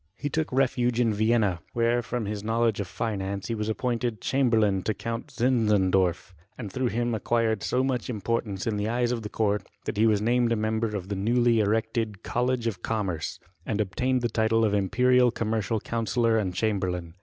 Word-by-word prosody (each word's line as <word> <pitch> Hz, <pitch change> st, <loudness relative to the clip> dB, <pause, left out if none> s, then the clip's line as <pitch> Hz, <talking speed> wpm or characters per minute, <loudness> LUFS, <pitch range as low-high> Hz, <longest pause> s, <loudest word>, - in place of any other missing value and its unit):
He 145 Hz, +5 st, -3 dB
took 160 Hz, +2 st, -1 dB
refuge 125 Hz, -2 st, +1 dB
in 115 Hz, -3 st, +3 dB
Vienna, 105 Hz, -4 st, +2 dB
where, 120 Hz, +1 st, +2 dB
from 120 Hz, -1 st, -3 dB
his 105 Hz, 0 st, -4 dB
knowledge 115 Hz, -1 st, +1 dB
of 100 Hz, -, -2 dB
finance, 100 Hz, +1 st, -3 dB
he -, -, 0 dB
was 105 Hz, -1 st, -2 dB
appointed 120 Hz, 0 st, -1 dB
chamberlain 110 Hz, -7 st, +2 dB
to 105 Hz, +4 st, -2 dB
Count 115 Hz, 0 st, -4 dB
Zinzendorf, 100 Hz, -8 st, +1 dB, 0.2 s
and 105 Hz, -6 st, -7 dB
through 130 Hz, -1 st, 0 dB
him 120 Hz, +1 st, -1 dB
acquired 110 Hz, 0 st, 0 dB
so 125 Hz, +6 st, 0 dB
much 130 Hz, -3 st, -1 dB
im 110 Hz, -4 st, -3 dB
portance 105 Hz, -2 st, -2 dB
in 110 Hz, -2 st, -1 dB
the 105 Hz, +1 st, -1 dB
eyes 120 Hz, +1 st, +1 dB
of 120 Hz, -2 st, -2 dB
the 105 Hz, -, -6 dB
court, 105 Hz, -1 st, 0 dB, 0.2 s
that -, -, -3 dB
he 110 Hz, +2 st, +4 dB
was 105 Hz, -2 st, +3 dB
named 120 Hz, +2 st, +2 dB
a -, -, +3 dB
member 110 Hz, 0 st, -1 dB
of 95 Hz, -1 st, -5 dB
the 100 Hz, -, -2 dB
newly 120 Hz, +3 st, +2 dB
erected 110 Hz, 0 st, -1 dB
College 125 Hz, 0 st, 0 dB
of 100 Hz, -6 st, -2 dB
Commerce, 95 Hz, -8 st, -2 dB, 0.2 s
and 105 Hz, -, -2 dB
obtained 125 Hz, +5 st, 0 dB
the -, -, +3 dB
title 110 Hz, 0 st, +2 dB
of 105 Hz, -, +1 dB
imperial 125 Hz, +5 st, +3 dB
commercial 110 Hz, -1 st, -1 dB
coun* 115 Hz, +1 st, -3 dB
sellor 115 Hz, -2 st, +2 dB
and 90 Hz, -3 st, -3 dB
chamberlain. 90 Hz, -5 st, -1 dB
110 Hz, 195 wpm, -26 LUFS, 105-120 Hz, 0.2 s, he